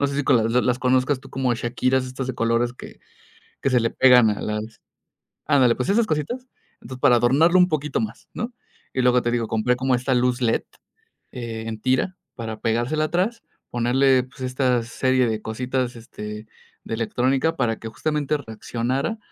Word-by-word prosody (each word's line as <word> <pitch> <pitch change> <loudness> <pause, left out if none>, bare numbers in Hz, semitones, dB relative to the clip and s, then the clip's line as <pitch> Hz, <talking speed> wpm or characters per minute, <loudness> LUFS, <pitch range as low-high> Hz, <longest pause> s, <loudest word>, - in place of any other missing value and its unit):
no 140 - +3
sé, 140 - -4
si 145 - +1
co - - +4
las 115 -1 +2
las 125 0 +2
conozcas 130 +2 +2
tú - - -14
como 130 -2 0
Chaquiras, 125 +2 0
estas 130 0 -5
de 130 - -3
colores 115 +1 +1
que - - -12 0.6
que - - +1
se 125 -2 +3
le 115 - 0
pegan 125 -4 +6
a 105 - -4
las 105 0 -4 0.7
Ándale, 130 -5 +4
pues, 125 - -3
esas 220 +3 +3
cositas. 160 - -3 0.3
Entonces, 130 +2 -9
para 120 - +6
adornarlo 155 +10 +4
un 180 - +5
poquito 150 -5 -1
más, 110 +2 -6
¿no? 235 +2 -4 0.4
Y 130 - 0
luego, 125 0 +4
te 120 - -1
digo, 115 -2 0
compré 110 +3 +1
como 130 0 +1
esta 130 +2 0
luz 125 +1 +1
led, 115 -2 +1 0.7
eh, 115 -3 -6
en 110 -1 -5
tira 130 +9 0 0.2
para 110 -2 -6
pegársela 120 +7 0
atrás, 195 +8 -1 0.3
ponerle, 125 +2 +3
pues, 125 0 -16
esta 125 -2 +1
serie 130 +1 +1
de 110 -1 -2
cositas, 125 +2 -2
este, 105 -1 -8 0.4
de - - -5
electrónica 130 +7 0
para 115 -4 0
que, 115 - -8
justamente, 150 +3 -1
reaccionara 125 - -3
125 Hz, 185 wpm, -23 LUFS, 115-135 Hz, 0.7 s, pegan